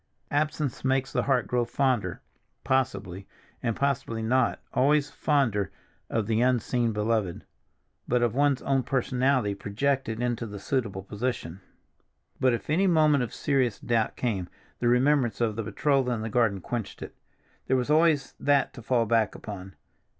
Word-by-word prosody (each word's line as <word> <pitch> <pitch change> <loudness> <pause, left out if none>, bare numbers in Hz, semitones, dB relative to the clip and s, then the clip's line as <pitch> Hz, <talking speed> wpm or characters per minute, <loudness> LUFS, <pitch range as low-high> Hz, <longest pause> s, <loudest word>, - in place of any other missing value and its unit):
"Absence 150 -2 -1
makes 135 0 0
the - - +2
heart 130 -4 +1
grow 125 -1 +1
fonder"—possibly, 120 -3 -2 0.3
and 115 -3 -1
possibly 130 -5 -1
not 125 +2 +2
always 145 +3 +3
fonder 120 -10 +1 0.4
of 110 -2 0
the 110 +1 +1
unseen 120 -1 +1
beloved, 105 -4 -1 0.6
but 125 -1 +2
of 120 -2 +1
one's 140 0 +2
own 135 -1 +2
personality, 130 -3 +1
projected 115 +4 -1
into 120 -1 -1
the 100 -1 -7
suitable 100 -4 -2
position. 100 -3 -4 0.8
But 130 - +4
if 120 - -3
any 180 +6 +2
moment 155 -6 +4
of 120 - -5
serious 130 -6 0
doubt 115 -3 0
came, 100 -8 -2 0.3
the 120 - 0
remembrance 125 0 +3
of 115 -3 0
the 115 - -2
betrothal 135 +3 +1
in 115 -3 -2
the 110 - -3
garden 110 -4 +1
quenched 115 +1 -5
it. - - -9 0.5
There 130 - +3
was 125 +3 -1
always 155 -2 +3
that 140 -1 +2
to 120 - -10
fall 115 0 +1
back 110 -2 +1
upon. 95 -3 -8
125 Hz, 150 wpm, -27 LUFS, 110-135 Hz, 0.8 s, But